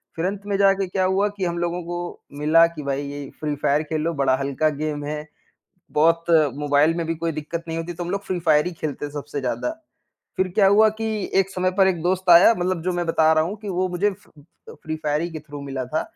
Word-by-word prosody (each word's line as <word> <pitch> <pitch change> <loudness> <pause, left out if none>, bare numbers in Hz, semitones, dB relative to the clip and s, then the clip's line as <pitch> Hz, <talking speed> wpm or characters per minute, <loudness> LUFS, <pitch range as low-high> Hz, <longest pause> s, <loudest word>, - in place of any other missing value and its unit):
फिर 165 - -2
अंत 200 +1 -3
में 200 -1 0
जाके 195 -1 +3
क्या 185 +1 0
हुआ 195 +2 +2
कि 190 - -1
हम 170 0 -2
लोगों 175 0 -2
को 175 +1 -4 0.4
मिला 165 +3 +5
कि 150 - -6
भाई 140 0 -2
ये 145 -1 -7
फ्री 150 -1 -1
फायर 145 +2 +1
खेलो, 155 +2 -2
बड़ा 135 -2 +2
हल्का 140 +3 0
गेम 150 0 -3
है, 150 0 -4 0.7
बहुत 165 +2 +3 0.3
मोबाइल 145 +2 +3
में 165 -1 -2
भी 165 - -1
कोई 165 0 -2
दिक्कत 155 +2 -5
नहीं 165 0 -3
होती 170 +1 -4
तो 175 +1 -5
हम 175 - -5
लोग 200 +1 -2
फ्री 185 -2 -2
फायर 155 -1 +3
ही 180 - -2
खेलते 145 -2 -5
सबसे 145 -1 -5
ज़्यादा। 130 - -2 0.7
फिर 185 0 +1
क्या 200 -2 +5
हुआ 215 +2 +6
कि 225 - -1 0.4
एक 195 - -1
समय 185 -1 0
पर 190 - +6
एक 175 -3 -1
दोस्त 185 +1 -1
आया 175 +6 +8
मतलब 180 -1 -1
जो 185 +1 -1
मैं 175 0 -1
बता 160 -1 +3
रहा 155 0 +3
हूँ 195 +6 -4
कि - - -4
वो 185 0 0
मुझे 180 +3 +1
फ 205 +2 -18 0.4
अ, - - -8
फ्री 155 0 -4
फायर 150 +1 +1
ही 170 - -3
के 160 - -5
थ्रू 145 0 -10
मिला 135 -2 -4
था, 155 +5 -1
165 Hz, 245 wpm, -23 LUFS, 150-185 Hz, 0.7 s, आया